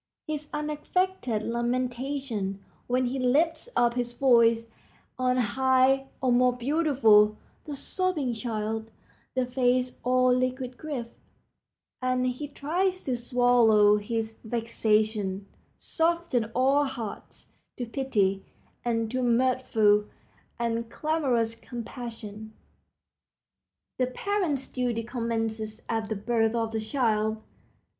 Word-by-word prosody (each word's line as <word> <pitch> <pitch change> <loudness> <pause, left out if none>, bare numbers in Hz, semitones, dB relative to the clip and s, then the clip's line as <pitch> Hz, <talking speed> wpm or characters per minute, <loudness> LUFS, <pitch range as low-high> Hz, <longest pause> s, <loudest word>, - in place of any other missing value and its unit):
His 300 -1 -4
unaffected 300 - -1
lamentation 240 -3 -2 0.2
when 255 +1 +1
he 260 +2 -2
lifts 310 - +1
up 240 -1 +3
his 240 -1 -2
voice 235 -3 +4 0.5
on 255 0 +2
high, 260 +2 +3
or, 255 -2 +2
more 250 +1 +4
beautiful, 245 -7 +4 0.3
the 295 -2 -5
sobbing 310 -4 -1
child—the 225 +2 -4
face 250 0 +1
all 255 0 +4
liquid 255 0 -1
grief, 285 -6 -4 1.0
as 255 0 +1 0.2
he 295 - -4
tries 360 +7 -1
to 255 - -1
swallow 235 -4 +4
his 220 +1 -3
vexation—soften 220 - -1
all 270 +3 +3
hearts 235 -6 -7 0.3
to 245 - -3
pity 215 -7 0 0.4
and 230 -2 -1
to 255 +1 -1
mirthful 235 -4 +3 0.5
and 230 -1 -2
clamorous 260 -8 0
compassion. 230 -2 -8 1.5
The 255 - +2
parent's 310 -2 -1
duty 245 -3 -2
commences 225 -2 -3
at 225 -2 -2
the 220 - -1
birth 225 +2 +1
of 225 -1 -1
the 220 -1 -2
child. 220 -3 0
245 Hz, 105 wpm, -27 LUFS, 225-265 Hz, 1.5 s, voice